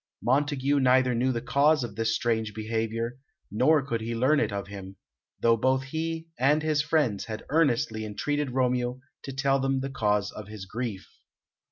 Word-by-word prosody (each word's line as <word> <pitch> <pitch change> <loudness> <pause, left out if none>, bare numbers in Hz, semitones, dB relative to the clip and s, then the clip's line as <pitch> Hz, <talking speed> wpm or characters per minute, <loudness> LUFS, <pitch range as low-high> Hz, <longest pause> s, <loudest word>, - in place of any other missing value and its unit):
Montague 140 +1 +2
neither 130 -1 +4
knew 125 +3 +1
the 120 -1 -3
cause 145 +2 +3
of 115 -3 -5
this 110 0 0
strange 110 -3 -1
behaviour, 115 +2 -3 0.3
nor 135 +7 +3
could 115 -4 -2
he 115 +1 -3
learn 135 +6 +3
it 110 - 0
of 100 0 -3
him, 95 -1 -9 0.4
though 115 0 +4
both 130 +3 +1
he 160 +3 -4
and 145 +4 +3
his 155 -2 +2
friends 145 -9 0
had 110 -1 -6
earnestly 125 -8 +1
entreated 145 +7 -2
Romeo 125 -1 0 0.2
to 135 - -7
tell 135 0 +1
them 135 0 0
the 135 0 -4
cause 105 -4 0
of 105 -2 -9
his 105 -2 -8
grief. 110 -1 -5
125 Hz, 175 wpm, -27 LUFS, 110-140 Hz, 0.4 s, neither